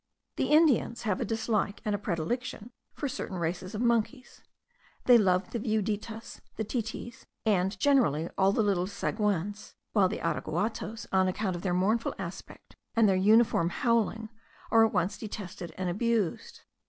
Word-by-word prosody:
The - - +1
Indians 300 -6 +3
have 210 -5 -1
a - - 0
dislike 220 -2 -1
and 210 - 0
a 205 - -1
predilection 215 +6 -3 0.2
for 290 - -2
certain 250 -8 -5
races 180 +4 -3
of 210 - -2
monkeys; 235 +2 -1 0.6
they 250 - +8
love 185 -2 +2
the 235 - -2
viuditas, 220 +1 -3
the 220 - -2
titis, 235 +2 -5 0.2
and 195 -2 +1
generally 230 - +3
all 190 0 +4
the 220 - +1
little 190 -3 +1
sagoins; 205 0 -2 0.2
while 195 -4 +4
the 215 - -3
araguatos, 220 +1 -2
on 190 -1 +3
account 185 0 -1
of 175 - -6
their 180 -2 0
mournful 215 +6 +1
aspect, 180 -2 -9 0.2
and 225 -2 +5
their 195 - +3
uniform 210 -2 +4
howling, 225 -1 0 0.4
are 225 0 +6
at 225 - +3
once 180 +1 -1
detested 195 -5 -7
and 185 -1 -2
abused. 210 0 -1
210 Hz, 155 wpm, -29 LUFS, 185-230 Hz, 0.6 s, they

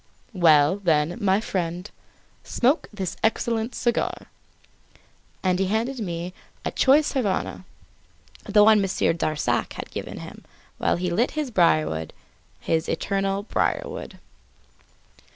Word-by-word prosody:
"Well, 160 -2 +5
then, 165 0 +1
my 195 0 +3
friend, 180 -3 -3 0.6
smoke 265 +7 +1
this 190 -4 -4
excellent 225 +1 0
cigar." 240 -2 -1 1.1
And 185 -1 +1
he 195 - +1
handed 230 +6 -1
me 175 -3 -4 0.3
a - - -1
choice 290 +3 +4
Havana, 205 -7 -2 0.9
one 210 0 +6
Monsieur 195 -3 +1
Darzac 155 -2 -1
had - - -8
given - - -6
him, - - -11 0.4
while - - +2
he 180 0 -2
lit 230 +9 +2
his 295 -4 -2
briarwood 80 - +2 0.5
his 160 0 -1
eternal 195 0 -1
briarwood. - - -2
195 Hz, 115 wpm, -24 LUFS, 170-225 Hz, 1.1 s, one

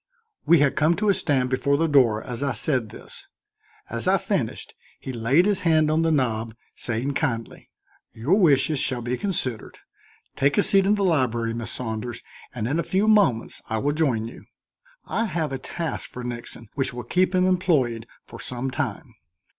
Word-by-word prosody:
We 170 -3 +6
had 140 -2 +3
come 155 +3 +3
to 210 +2 0
a - - +6
stand 130 -7 0
before 140 +2 +1
the 165 - +2
door 125 -8 +3
as 120 +1 -6
I 140 -2 0
said 120 -1 0
this. - - -11 0.6
As - - -3
I - - +5
finished, - - -3 0.3
he 130 - -6
laid 125 +9 +3
his 205 -2 +1
hand 155 -3 +3
on 160 +1 +2
the 165 - +2
knob, 115 -6 0 0.2
saying 120 +4 -2
kindly: 120 -7 -3 0.4
"Your 120 +10 -1
wishes 155 -6 +3
shall 125 -2 -1
be 125 +1 -1
considered. 130 - -3 0.6
Take 140 +1 +1
a - - +5
seat 195 -1 +4
in 210 - +4
the 200 - -1
library, 120 -10 +1
Miss 115 0 -5
Saunders, 120 0 -5 0.3
and 115 -3 -3
in 145 +6 0
a - - 0
few 195 +3 +1
moments 200 - +2
I 110 - -1
will 145 +6 0
join 130 -8 0
you. 115 - -12 0.6
I 230 - -1
have 165 -7 -2
a 135 - -3
task 165 +3 -4
for 125 - -8
Nixon 120 -2 -7
which 135 -3 -2
will 125 - -5
keep 185 - +1
him 185 0 +3
employed 150 - +1 0.2
for - - -11
some 125 +1 -4
time." 135 -1 -4
135 Hz, 185 wpm, -24 LUFS, 120-165 Hz, 0.6 s, We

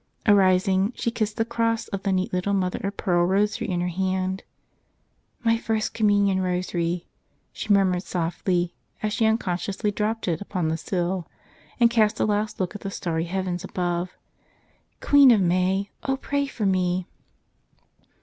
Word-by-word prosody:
Arising, 190 0 +4
she 235 - -1
kissed 215 -2 -2
the 225 - +1
cross 230 -1 -1
of 195 -3 -4
the 200 - 0
neat 185 0 0
little 185 +2 0
mother 185 -2 -1
of 200 +1 -3
pearl 175 -3 +2
rosary 200 +4 +1
in 175 -2 0
her 180 - 0
hand. 185 +1 -1 1.0
"My 230 -1 +3
First 220 -1 -1
Communion 205 -3 +2
Rosary,'' 180 -1 -1 0.5
she 215 - -3
murmured 190 -3 +3
softly 175 0 -1 0.3
as 210 -1 0
she 225 -1 +2
unconsciously 205 -1 -1
dropped 215 +2 -2
it 165 -1 -1
upon 185 -5 -2
the 160 - -1
sill 175 +1 -2 0.5
and 235 -1 +5
cast 220 -2 +2
a - - +3
last 210 0 -1
look 185 -2 -1
at 205 - -8
the 195 - -4
starry 165 -4 -2
heavens 180 0 -3
above. 180 -1 -3 0.8
"Queen 285 -2 +7
of 230 -4 +6
May, 185 +2 +1
O 270 0 -1
pray 280 +1 -1
for 225 -6 -3
me!" 185 -1 +1
190 Hz, 160 wpm, -24 LUFS, 180-210 Hz, 1.0 s, Queen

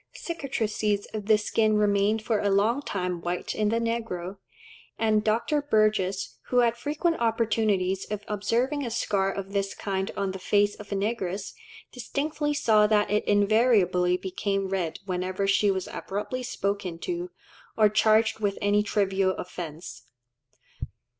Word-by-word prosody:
Cicatrices 220 - -2
of 210 -2 -5
the 215 -1 +6
skin 215 0 +1
remain 205 +1 +2
for 220 0 -1
a 205 - +1
long 215 +7 +2
time 180 -8 -3
white 175 +1 -3
in 210 -1 0
the 230 - +1
negro, 225 -6 -3 0.6
and 215 -1 +2
Dr. 230 +7 +1
Burgess, 215 -7 +1
who 250 - 0
had 235 -1 +4
frequent 305 +7 -1
opportunities 215 -5 +1
of 210 -1 -5
observing 235 +8 0
a 240 - -3
scar 200 -4 0
of 195 0 -6
this 195 -1 -1
kind 190 -1 -2
on 195 -1 -1
the 190 - -7
face 205 +2 +2
of 210 -1 -12
a - - 0
negress, 200 -2 -2 0.4
distinctly 295 +4 -2
saw 215 -7 +4
that 210 -1 +2
it 210 - +2
"invariably 205 -4 +3
became 195 +1 -2
red 175 -4 -2
whenever 185 +1 -2
she 200 +1 +3
was 190 -1 -1
abruptly 210 +6 -4
spoken 200 -7 -3
to, 350 - -4 0.5
or 215 -1 +6
charged 220 +1 +3
with 205 -2 -1
any 205 0 +2
trivial 195 -2 +1
offence." 165 -7 -7
210 Hz, 145 wpm, -26 LUFS, 195-225 Hz, 0.6 s, the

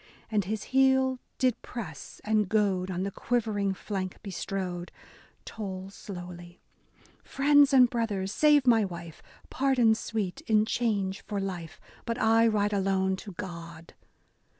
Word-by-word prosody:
And 210 -3 +1
his 210 +2 -3
heel 265 -1 +4 0.2
did 255 -3 +1
press 190 - -8
and 210 -2 +1
goad 195 -4 +1
on 185 0 -2
the 200 - -2
quiver 225 -1 -1
ing 195 -1 0
flank 185 -2 -4
bestrode, 185 -3 -4 0.3
— - - -30
Toll 195 -3 -6
slowly, 175 -3 -9 0.6
"Friends 285 +1 +4
and 255 -2 +7
brothers, 210 -5 -2
save 295 +3 +4
my 230 -3 +5
wife! 170 -4 -7 0.2
— - - -27
Pardon 255 -4 +3
sweet, 215 -4 -3
in 215 -1 +4
change 205 -5 -1
for 205 -2 -3
life, 180 -4 -5
— - - -25
But 230 - -1
I 225 +1 +4
ride 210 -1 +1
alone 190 -1 +1
to 200 0 -9
God. 170 -3 -8
205 Hz, 150 wpm, -28 LUFS, 185-230 Hz, 0.6 s, and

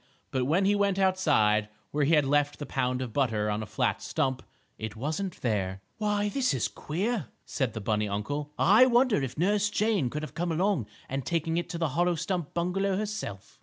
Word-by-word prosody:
But 130 -1 0
when 170 +8 +2
he 200 - +4
went 200 -1 +1
outside, 150 - +3 0.2
where 145 0 +1
he 160 +3 +4
had 150 -2 +4
left 145 +1 +2
the 145 - -5
pound 125 -1 -1
of 120 -4 -7
butter 110 -6 +1
on 105 +1 -1
a 110 - -5
flat - - 0
stump, 130 -1 -1 0.4
it 110 -1 -5
wasn't 155 - -3
there. 95 -5 -1 0.2
"Why, 210 -1 +1
this 255 - +1
is 125 - 0
queer," 195 - -2 0.2
said 130 -6 -2
the 110 - -5
bunny 105 0 0
uncle. 145 +9 -3
"I 220 +7 +6
wonder 245 - +3
if 135 0 -4
Nurse 205 +5 +2
Jane 210 - +1
could 150 +4 -4
have 155 - -6
come 175 0 -2
along 175 - +1 0.2
and 135 +1 -3
taken 165 +2 -1
it 170 -1 -2
to 170 - -4
the 165 -2 0
hollow 175 +5 +1
stump 170 -1 -3
bungalow 190 +3 0
herself?" 210 - -5
155 Hz, 205 wpm, -28 LUFS, 125-195 Hz, 0.4 s, I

